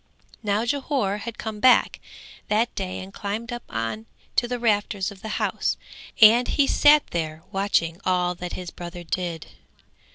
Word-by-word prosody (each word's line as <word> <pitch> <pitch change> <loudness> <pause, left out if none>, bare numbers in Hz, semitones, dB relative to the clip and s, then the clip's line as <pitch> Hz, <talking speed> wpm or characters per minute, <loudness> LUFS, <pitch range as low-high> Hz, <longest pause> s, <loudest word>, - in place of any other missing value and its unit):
Now 210 +1 0
Jhore 260 -6 -1
had 225 0 -7
come 215 -1 -5
back 255 +3 +4 0.5
that 225 +3 +1
day 185 -2 -4
and 190 +1 -10
climbed 220 +5 -4
up 240 - -5
on 115 -1 -4 0.3
to 240 - +2
the 245 0 -2
rafters 205 -3 0
of 195 -1 -13
the 220 - -6
house, - - -1 0.4
and 230 +3 +7
he 285 - +3
sat 295 +1 +5
there 160 -1 -3
watching 190 -3 0
all 180 -1 +1
that 180 0 -7
his 180 -2 -6
brother 175 0 -8
did. 170 -1 -3
200 Hz, 160 wpm, -24 LUFS, 175-235 Hz, 0.5 s, and